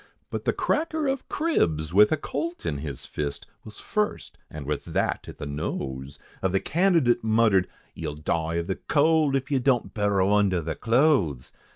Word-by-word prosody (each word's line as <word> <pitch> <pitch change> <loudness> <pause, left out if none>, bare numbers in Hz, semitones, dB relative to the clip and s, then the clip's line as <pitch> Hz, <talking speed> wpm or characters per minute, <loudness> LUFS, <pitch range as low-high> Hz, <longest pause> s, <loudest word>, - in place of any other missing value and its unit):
But - - -4
the - - +3
cracker 315 0 -1
of 270 -1 -2
cribs, 80 - 0
with 105 +2 +6
a 155 - +2
colt 160 - -4
in 75 -4 -2
his 70 -3 -6
fist, 70 -1 -4 0.2
Was 110 -1 -11
first, 210 -1 -2
and 75 -2 -8
with 75 0 -2
that - - -1
at - - -10
the - - -6
nose 70 -1 -4 0.2
Of 95 -1 0
the 95 - +3
candidate, 160 - +2
muttered 110 -4 +3 0.3
"You'll 75 - -5
die 80 +2 -1
of 85 0 -1
the 95 - -3
cold, 155 -1 +2
If 135 +1 -2
you 135 - +3
don't 125 -2 +1
burrow 100 -2 +2
under 100 -3 +3
the 80 -1 -3
clothes! 115 - +1
105 Hz, 180 wpm, -26 LUFS, -, 0.3 s, with